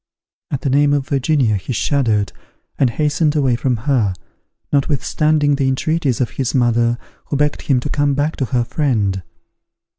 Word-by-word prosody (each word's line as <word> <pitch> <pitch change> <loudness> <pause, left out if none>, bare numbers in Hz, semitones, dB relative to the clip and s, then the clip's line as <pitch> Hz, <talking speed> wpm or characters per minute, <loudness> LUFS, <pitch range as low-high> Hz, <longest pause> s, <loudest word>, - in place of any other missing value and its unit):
At 140 - -3
the 140 - -1
name 145 +1 +3
of 140 -2 0
Virginia 135 -5 +1
he 100 +7 -5
shuddered, 110 - 0 0.5
and 135 - +4
hastened 150 +4 0
away 135 -5 +2
from 125 0 0
her, 115 -10 +1 0.6
notwithstanding 145 +1 +1
the 135 -2 +1
entreaties 135 -1 0
of 125 - 0
his 130 -1 -2
mother, 120 -1 +2 0.3
who 145 - -2
begged 150 +1 0
him 135 -3 +1
to - - -4
come 145 -1 +1
back 145 +3 0
to 135 - 0
her 125 -1 0
friend. 110 -9 0
135 Hz, 160 wpm, -18 LUFS, 120-145 Hz, 0.6 s, and